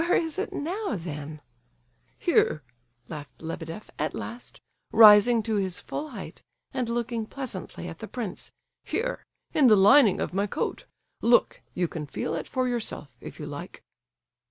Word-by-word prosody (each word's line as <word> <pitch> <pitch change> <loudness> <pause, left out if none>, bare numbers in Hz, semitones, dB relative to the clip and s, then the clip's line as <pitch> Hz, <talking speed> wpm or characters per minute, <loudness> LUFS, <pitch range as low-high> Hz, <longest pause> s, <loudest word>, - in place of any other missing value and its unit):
"Where 340 +1 +2
is 325 -2 0
it - - -2
now, 360 - -2
then?" 150 -3 -7 0.8
"Here," 150 - +2 0.4
laughed 145 -4 -9
Lebedeff, 165 +4 -7
at - - -1
last, 240 +1 -7 0.3
rising 220 +1 +8
to 220 -1 0
his 190 -3 -1
full 305 +1 -5
height - - -8 0.3
and 255 -4 -2
looking 235 -1 -2
pleasantly 225 -10 -6
at 165 -2 -8
the 220 - -6
prince, 230 -6 -5 0.3
"here, 455 +10 -2 0.3
in 285 -4 +5
the 215 - +8
lining 205 +2 +6
of - - -2
my 200 +2 +1
coat. 290 - -3 0.4
Look, 240 +1 +3
you 175 -1 +1
can 155 -2 -6
feel 140 - -3
it 165 -2 -3
for 255 -1 0
yourself, 215 - -3
if - - -9
you - - -5
like!" - - -8
215 Hz, 155 wpm, -27 LUFS, 170-250 Hz, 0.8 s, rising